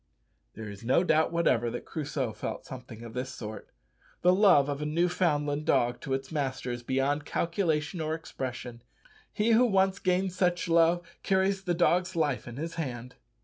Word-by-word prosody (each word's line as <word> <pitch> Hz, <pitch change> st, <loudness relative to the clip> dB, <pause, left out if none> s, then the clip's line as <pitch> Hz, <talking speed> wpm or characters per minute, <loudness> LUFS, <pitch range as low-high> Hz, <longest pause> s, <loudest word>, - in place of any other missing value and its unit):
There 110 Hz, -1 st, -7 dB
is 100 Hz, 0 st, -9 dB
no 130 Hz, +9 st, +3 dB
doubt 160 Hz, -3 st, +3 dB
whatever 125 Hz, -9 st, +2 dB
that 120 Hz, -, -6 dB
Crusoe 145 Hz, -7 st, -3 dB
felt 105 Hz, -, -5 dB
something 125 Hz, -3 st, -9 dB
of 115 Hz, -1 st, -9 dB
this 125 Hz, +1 st, -3 dB
sort. 110 Hz, -4 st, -8 dB, 0.5 s
The 180 Hz, +1 st, +6 dB
love 185 Hz, -8 st, +5 dB
of 145 Hz, 0 st, -3 dB
a -, -, -2 dB
Newfoundland 155 Hz, -3 st, +1 dB
dog 120 Hz, 0 st, +2 dB
to 135 Hz, -3 st, -1 dB
its 135 Hz, +2 st, -6 dB
master 135 Hz, -4 st, -2 dB
is 120 Hz, 0 st, -4 dB
beyond 135 Hz, +4 st, 0 dB
calculation 165 Hz, 0 st, -1 dB
or 155 Hz, 0 st, -1 dB
expression. 125 Hz, -6 st, -6 dB, 0.5 s
He 215 Hz, +2 st, +1 dB
who 230 Hz, +2 st, +6 dB
once 195 Hz, -2 st, +2 dB
gains 185 Hz, 0 st, 0 dB
such 180 Hz, -1 st, +1 dB
love 170 Hz, +1 st, +3 dB
carries 190 Hz, 0 st, +1 dB
the 175 Hz, -2 st, +1 dB
dog's 180 Hz, +1 st, +2 dB
life 145 Hz, -7 st, 0 dB
in 120 Hz, -, -7 dB
his 165 Hz, +5 st, -4 dB
hand. 125 Hz, -3 st, -6 dB
150 Hz, 175 wpm, -29 LUFS, 130-175 Hz, 0.5 s, The